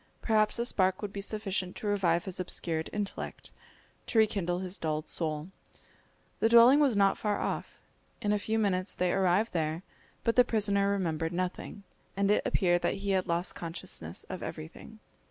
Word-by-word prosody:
Perhaps 215 -1 +2
a 235 - -1
spark 190 -3 +2
would 205 -1 -4
be 200 - -4
sufficient 195 -3 -2
to - - -8
revive 180 -5 +1
his 190 -2 -2
obscured 165 -3 -2
intellect, 205 -1 -5 0.6
to 230 - -2
rekindle 195 -5 +2
his 185 0 -4
dulled 155 -3 -3
soul. 155 0 -2 0.9
The 225 - +3
dwelling 235 +4 +7
was 275 -6 +3
not 195 -1 +3
far 210 -1 -1
off. - - -4 0.4
In 205 0 0
a 210 - +1
few 220 +2 -1
minutes 195 -3 0
they 180 -1 +1
arrived 195 +4 +2
there, 160 +1 -1 0.4
but 230 - +1
the 250 - +7
prisoner 200 -4 +1
remembered 165 -4 -1
nothing, 185 +3 -4 0.3
and 200 0 +2
it 210 - +3
appeared 175 -2 +2
that - - 0
he 200 - +1
had 190 -1 +1
lost 170 +2 -1
consciousness 160 - -4
of - - -7
everything. 80 - -8
195 Hz, 170 wpm, -30 LUFS, 175-210 Hz, 0.9 s, dwelling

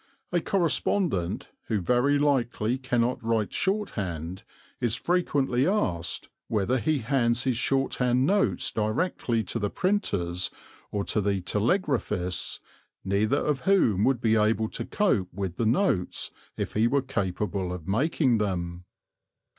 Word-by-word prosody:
A 175 -1 +2
correspondent, 170 - 0 0.2
who 110 - 0
very 125 +9 +2
likely 130 -4 +1
cannot 125 -1 0
write 110 -2 0
shorthand, 95 - -2 0.4
is 120 -3 +1
frequently 140 -7 +1
asked 90 - -1 0.2
whether 110 +4 +1
he 155 +5 +1
hands 120 -2 +2
his 130 -2 +1
shorthand 125 -1 +1
notes 200 +5 +1
directly 115 +1 0
to 115 - -3
the 105 -1 -1
printers 100 - 0 0.4
or 100 -1 -1
to 105 - 0
the 100 -1 0
telegraphists, 105 - 0 0.5
neither 105 +7 +2
of 145 -2 0
whom 110 - +4
would 130 -1 +2
be 110 -2 +3
able 110 0 +2
to - - -4
cope 115 - +1
with 95 -1 -4
the 115 - +1
notes 115 - +1 0.3
if - - -3
he 110 +2 +3
were 140 +2 +1
capable 100 -6 -2
of 90 -2 -7
making 130 - +2
them. 90 -3 -2
115 Hz, 130 wpm, -27 LUFS, 100-140 Hz, 0.5 s, whom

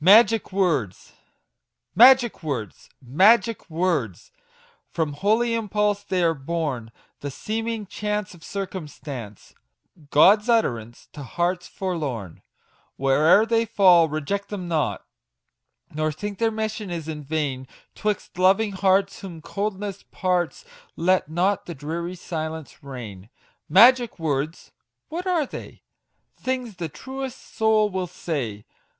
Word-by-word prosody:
MAGIC 220 +4 +6
WORDS. 160 - -1 0.8
Magic 245 -2 +6
words! 130 - -5
magic 200 - +3
words! 160 - -1 0.6
From 155 -3 -2
holy 220 +9 +1
impulse 210 -2 0
they 185 -3 -1
are 165 -1 +3
born, 140 -6 -3 0.3
The 145 - -5
seeming 225 - -3
chance 210 0 -3
of 170 -2 -16
circumstance, 150 - -7 0.6
God's 205 +10 +5
utterance 120 - 0
to 150 - -8
hearts 175 +6 -2
forlorn; 140 - -4 0.6
Where'er 150 +10 +4
they 230 0 +2
fall 180 -6 +5
reject 155 +7 -3
them 190 -4 -5
not, 160 -3 -1 0.9
Nor 155 +1 0
think 200 +6 -6
their 230 - +3
mission 215 -2 -3
is 165 -3 -5
in 150 -2 -5
vain; 140 -3 -2 0.3
'Twixt 210 -3 -3
loving 195 +3 +4
hearts, 195 0 +2
whom 175 -4 -8
coldness 200 +2 -4
parts, 180 - -1 0.3
Let 185 -1 +2
not 185 +5 0
the 170 - -6
dreary 170 +5 -4
silence 160 -4 -6
reign. 115 -8 -9 0.4
Magic 240 - +6
words! 155 -1 -3 0.4
what 350 +4 -4
are 345 -5 +2
they? - - -10 0.5
Things 250 -6 -3
the 165 -3 -4
truest 265 - -8
soul 215 -1 +3
will 185 -1 -2
say 120 -12 -4
180 Hz, 120 wpm, -24 LUFS, 150-210 Hz, 0.9 s, MAGIC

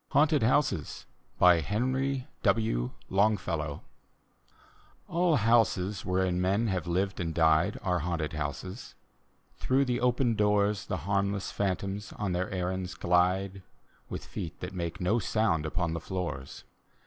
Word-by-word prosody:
HAUNTED 150 -1 +3
HOUSES: 130 +5 +1 0.3
henrv 125 - +2 0.2
w. 65 - +1 0.2
longfellow 90 -7 0 1.2
All 170 -1 +2
houses 110 -5 +2
wherein 90 -1 0
men 100 +5 +2
have 90 -3 -2
lived 95 +3 -1
and 85 -2 -2
died 80 +4 +3
Are 90 -2 +1
haunted 80 -2 -2
houses. 75 - -5 0.6
Through 135 +2 +2
the 125 -1 -1
open 125 -1 +2
doors 105 -1 +1
The - - -4
harmless 100 0 0
phantoms 100 +1 -2
on 105 -3 -3
their 90 +1 -1
errands 90 -1 -3
glide. 90 +3 +1 0.5
With - - -6
feet 80 - -6
that 90 +2 -6
make 85 -3 -4
no 100 +6 +2
sound 95 -7 +1
upon 85 0 -1
the 85 - -2
floors. 85 -6 -5
95 Hz, 125 wpm, -29 LUFS, 90-110 Hz, 1.2 s, HAUNTED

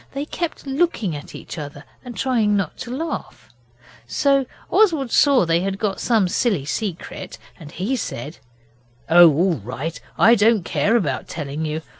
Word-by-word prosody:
They 280 +1 -3
kept 335 0 -4
looking 270 - 0
at 145 - -9
each - - -8
other 145 0 -8 0.2
and 245 -2 -9
trying 225 -6 +2
not 195 - -2
to 245 - -7
laugh, 290 - -6 0.6
so 275 - +2 0.2
Oswald 320 - +3
saw 275 -9 +5
they 165 0 +2
had 195 +2 -2
got 200 -2 -2
some 220 -6 +2
silly 185 - 0
secret 185 +3 -5 0.2
and 150 -3 -11
he 205 +12 -2
said 150 - -5 0.7
'Oh, 175 0 +9
all 175 +5 +2
right! 130 +8 -5 0.2
I 230 - +6
don't 215 -4 +3
care 225 - +1
about 145 - -1
telling 150 0 -4
you. 155 +1 -3
195 Hz, 160 wpm, -21 LUFS, 160-250 Hz, 0.7 s, Oh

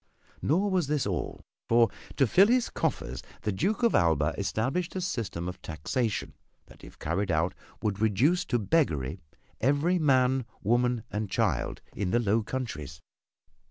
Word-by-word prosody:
Nor 190 +7 +2
was 180 -6 +1
this 150 -1 0
all 95 -5 -3 0.2
for 115 -2 +5 0.3
to 135 - +5
fill 190 - +6
his 245 +1 +2
coffers 60 +1 -2 0.2
the 105 - 0
Duke 195 - 0
of 235 - +4
Alva 80 -2 +3
established 130 - -1
a 185 - -1
system 115 - -3
of 90 +1 -6
taxation 105 - -2 0.3
that - - -18
if - - -13
carried 95 +6 -1
out 85 +2 +1 0.3
would 105 -2 -1
reduce 125 - +3
to 120 - +1
beggary 95 - +1 0.4
every 145 +8 +2
man, 130 -4 +3 0.2
woman 120 +1 +2
and 105 -1 -2
child - - 0
in 100 -3 -1
the 120 - +3
Low 110 0 +2
Countries. 80 - -5
115 Hz, 155 wpm, -28 LUFS, 95-145 Hz, 0.4 s, fill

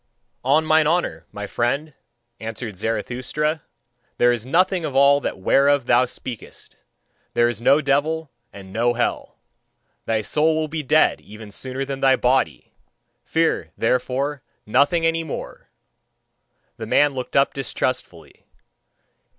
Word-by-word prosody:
"On 145 +5 +3
mine 155 -1 +4
honour, 175 +2 -1
my 105 0 -6
friend," 135 +8 -1 0.5
answered 110 -1 -6
Zarathustra, 130 - -2 0.6
"there 120 - +4
is 120 0 -3
nothing 180 +4 +2
of 140 -4 -4
all 140 +1 +5
that - - -3
whereof 140 +7 +3
thou 120 +1 +4
speakest: 120 -2 -9 0.6
there 120 - +4
is 120 -2 -3
no 140 +5 +4
devil 150 +2 0 0.2
and 95 -1 -12
no 120 +2 +2
hell. 120 - -2 0.7
Thy 110 -1 +1
soul 155 +8 +2
will 155 0 -1
be 155 +1 -4
dead 155 +3 +3
even 105 0 -12
sooner 130 +5 -4
than 135 0 -5
thy 135 -1 +4
body: 125 - 0 0.5
fear, 165 0 0
therefore, 130 +4 -1 0.2
nothing 165 +9 +2
any 165 0 +1
more!" 160 - -8 1.1
The 110 -2 -6
man 145 +5 +3
looked 130 -1 -6
up 135 0 +3
distrustfully. 130 -9 -4
135 Hz, 135 wpm, -22 LUFS, 120-150 Hz, 1.1 s, all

